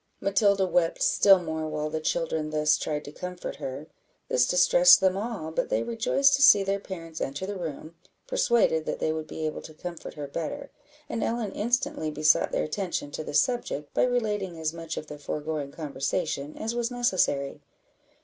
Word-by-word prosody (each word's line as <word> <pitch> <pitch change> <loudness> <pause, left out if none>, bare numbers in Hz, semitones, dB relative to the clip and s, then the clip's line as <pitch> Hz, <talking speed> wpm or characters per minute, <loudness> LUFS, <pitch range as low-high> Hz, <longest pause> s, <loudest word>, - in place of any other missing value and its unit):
Matilda 200 -1 +3
wept 175 -2 +1
still 195 -1 +6
more 160 -3 -4
while 155 0 -3
the 160 - -2
children 160 -1 -1
thus 150 0 +3
tried 150 -1 -3
to 145 - -8
comfort 180 +3 -6
her. 135 +3 -6 0.4
This 125 0 +3
distressed 180 0 +6
them 190 -1 +2
all; 200 -6 -4
but - - -1
they - - +1
rejoiced 235 +4 +2
to - - -3
see 205 -7 +8
their 195 +1 -1
parents 165 -5 -8
enter 140 +7 -3
the 200 +1 -4
room, 160 -2 -6 0.3
persuaded 235 - +2
that - - -2
they 155 - 0
would 155 -1 -5
be 160 - -5
able 155 - -3
to 155 - -12
comfort 175 +1 -8
her 150 -2 -5
better, 155 +3 -5 0.4
and 230 - -3
Ellen 230 -3 -1
instantly 225 -8 -1
besought 150 0 +3
their - - 0
attention 155 -3 -3
to 155 - -5
the 145 - -6
subject 150 - 0
by - - +3
relating 210 -8 -1
as 160 0 -2
much 165 -1 -6
of - - -4
the 150 -1 -9
foregoing 150 -1 -4
conversation 145 0 -3
as 225 +2 -3
was 240 -1 -1
necessary. 185 - 0
165 Hz, 185 wpm, -27 LUFS, 155-200 Hz, 0.4 s, see